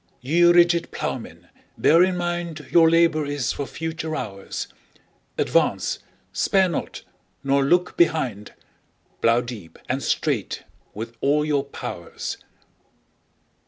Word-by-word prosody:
Ye 145 Hz, +7 st, +1 dB
rigid 175 Hz, 0 st, +5 dB
Ploughmen, -, -, -5 dB, 0.3 s
bear 165 Hz, +3 st, +5 dB
in 185 Hz, -1 st, +1 dB
mind 175 Hz, -3 st, -3 dB
Your 165 Hz, -1 st, +6 dB
labour 165 Hz, -2 st, +3 dB
is 145 Hz, -3 st, -1 dB
for 140 Hz, -, -4 dB
future 160 Hz, -1 st, -4 dB
hours: 100 Hz, -7 st, -5 dB, 0.7 s
Advance—spare 190 Hz, -2 st, 0 dB
not—nor 140 Hz, -3 st, -3 dB
look 175 Hz, +6 st, +2 dB
behind— 130 Hz, -12 st, +1 dB
15 -, -, -37 dB, 0.6 s
Plough 115 Hz, +1 st, +4 dB
deep 120 Hz, -9 st, -9 dB
and -, -, -1 dB
straight -, -, -1 dB, 0.3 s
with 115 Hz, +2 st, -6 dB
all 150 Hz, +2 st, +2 dB
your 145 Hz, -2 st, +1 dB
powers! 85 Hz, -10 st, -6 dB
155 Hz, 110 wpm, -23 LUFS, 130-170 Hz, 0.7 s, Your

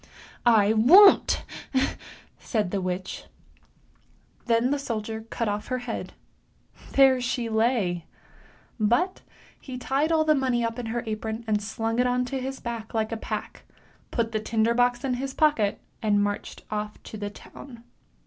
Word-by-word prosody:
" -, -, -26 dB, 0.2 s
I 205 Hz, +2 st, +3 dB
won't! 345 Hz, -, +7 dB, 0.5 s
" -, -, -15 dB, 0.2 s
said 210 Hz, -6 st, -1 dB
the 200 Hz, -, -1 dB
witch. 185 Hz, +1 st, -4 dB, 1.2 s
Then 235 Hz, +2 st, +2 dB
the 285 Hz, -, +1 dB
soldier 220 Hz, -4 st, -4 dB
cut 230 Hz, -, -2 dB
off 205 Hz, 0 st, -2 dB
her 255 Hz, -, -1 dB
head; 245 Hz, -2 st, -5 dB, 0.8 s
there 265 Hz, -2 st, +5 dB
she 240 Hz, -1 st, -2 dB
lay! 220 Hz, -7 st, 0 dB, 0.7 s
But 240 Hz, -, +1 dB, 0.4 s
he 260 Hz, -2 st, -8 dB
tied 275 Hz, +5 st, 0 dB
all 320 Hz, -1 st, +4 dB
the 310 Hz, -, +5 dB
money 255 Hz, -4 st, +1 dB
up 230 Hz, +1 st, -3 dB
in 240 Hz, -, -4 dB
her 235 Hz, +2 st, -2 dB
apron, 220 Hz, +1 st, -4 dB, 0.2 s
slung 225 Hz, +2 st, -2 dB
it 250 Hz, -, +3 dB
on 250 Hz, 0 st, +1 dB
his 265 Hz, +1 st, -4 dB
back 230 Hz, -2 st, -6 dB
like 220 Hz, 0 st, 0 dB
a -, -, -1 dB
pack, -, -, -5 dB, 0.5 s
put 230 Hz, -2 st, -1 dB
the 215 Hz, -, -1 dB
tinder 220 Hz, +1 st, +1 dB
box 245 Hz, 0 st, +2 dB
in 265 Hz, -2 st, 0 dB
his 270 Hz, 0 st, -4 dB
pocket, 265 Hz, -10 st, +2 dB, 0.2 s
and 205 Hz, -2 st, +2 dB
marched 205 Hz, 0 st, -4 dB
off 210 Hz, 0 st, -3 dB
to -, -, -9 dB
the 205 Hz, 0 st, -4 dB
town. 235 Hz, +3 st, -13 dB
230 Hz, 160 wpm, -26 LUFS, 215-255 Hz, 1.2 s, won't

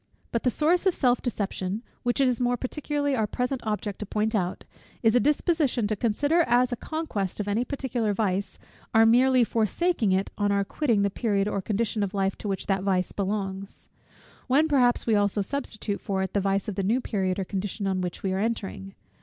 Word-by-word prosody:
But 235 Hz, -, 0 dB
the 250 Hz, -, +2 dB
source 335 Hz, -, +2 dB
of 370 Hz, -, +3 dB
self 250 Hz, -2 st, +2 dB
deception, 205 Hz, -2 st, -3 dB, 0.2 s
which 245 Hz, +2 st, 0 dB
it 270 Hz, -, +4 dB
is 250 Hz, -1 st, 0 dB
more 245 Hz, 0 st, +1 dB
particularly 285 Hz, +2 st, -1 dB
our 220 Hz, -3 st, 0 dB
present 250 Hz, +3 st, -2 dB
object 210 Hz, -2 st, -2 dB
to 210 Hz, -, -4 dB
point 215 Hz, +2 st, -1 dB
out, 185 Hz, -4 st, -1 dB, 0.4 s
is 225 Hz, -1 st, +5 dB
a -, -, +6 dB
disposition 295 Hz, -, +1 dB
to 215 Hz, +1 st, 0 dB
consider 285 Hz, -, +2 dB
as 245 Hz, +1 st, +3 dB
a -, -, 0 dB
conquest 230 Hz, -, -3 dB
of 205 Hz, -, -2 dB
any 210 Hz, +4 st, +1 dB
particular 250 Hz, -5 st, -2 dB
vice, 200 Hz, -1 st, -1 dB, 0.4 s
our 225 Hz, 0 st, +7 dB
merely 250 Hz, +2 st, +5 dB
forsaking 230 Hz, -, +1 dB
it 190 Hz, +1 st, 0 dB
on 205 Hz, 0 st, +2 dB
our 200 Hz, 0 st, +2 dB
quitting 225 Hz, -1 st, +1 dB
the 200 Hz, -, +1 dB
period 200 Hz, -2 st, 0 dB
or 200 Hz, -2 st, -1 dB
condition 215 Hz, +2 st, -1 dB
of 200 Hz, 0 st, -2 dB
life 195 Hz, 0 st, 0 dB
to -, -, -5 dB
which 195 Hz, -1 st, -2 dB
that 195 Hz, -1 st, 0 dB
vice 185 Hz, -2 st, 0 dB
belongs; 195 Hz, -1 st, -4 dB, 0.6 s
when 285 Hz, +5 st, +4 dB
perhaps 250 Hz, -6 st, +3 dB
also 205 Hz, -2 st, +2 dB
we -, -, 0 dB
substitute 215 Hz, -5 st, -4 dB
for 190 Hz, -1 st, -1 dB
it 190 Hz, -, -4 dB
the 200 Hz, -, +1 dB
vice 195 Hz, 0 st, 0 dB
of 210 Hz, -, -2 dB
the 195 Hz, -, -2 dB
new 215 Hz, +7 st, +2 dB
period 190 Hz, -6 st, -1 dB
or 195 Hz, -, -1 dB
condition 200 Hz, +2 st, -3 dB
on 190 Hz, -1 st, 0 dB
which 180 Hz, -1 st, -5 dB
we 190 Hz, -1 st, 0 dB
are 190 Hz, -, -1 dB
entering. 95 Hz, -, -3 dB
215 Hz, 210 wpm, -26 LUFS, 195-250 Hz, 0.6 s, our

